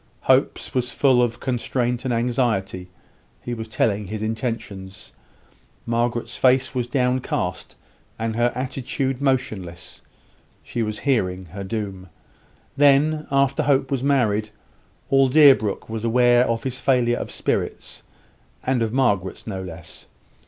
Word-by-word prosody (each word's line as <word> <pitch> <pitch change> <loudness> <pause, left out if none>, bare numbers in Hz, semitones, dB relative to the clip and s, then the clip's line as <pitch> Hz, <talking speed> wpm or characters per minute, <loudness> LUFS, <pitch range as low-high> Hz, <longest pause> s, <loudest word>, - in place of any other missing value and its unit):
Hope's - - +1
was 125 -1 -1
full 130 -3 +3
of 120 -1 0
constraint 125 -1 -1
and 130 - 0
anxiety; 115 -6 -1 0.5
he 120 - -5
was 110 -1 -5
telling 105 -2 0
his 110 +2 -4
intentions: 110 -4 -5 0.7
Margaret's 120 0 -1
face 130 0 +3
was 125 -2 -1
downcast, 125 -8 -1 0.4
and 110 0 -2
her 120 +1 +2
attitude 130 +1 -3
motionless; 105 -11 -2 0.6
she 120 - -4
was 110 -1 -2
hearing 95 -10 0
her 95 +4 -8
doom. 95 -2 -5 0.7
Then, 145 +2 +3
after 140 0 +2
Hope 135 -1 +1
was 135 -3 0
married, 115 -7 +1 0.6
all 135 -1 +5
Deerbrook 135 -8 +5
was 110 0 -5
aware 120 +1 +4
of 115 0 -1
his 130 -1 -4
failure 120 -3 +2
of - - -5
spirits; - - -3 0.6
and 130 -2 0
of 110 -1 0
Margaret's 105 -8 0
no 95 -4 -4
less. 85 -3 -10
120 Hz, 130 wpm, -22 LUFS, 105-130 Hz, 0.7 s, all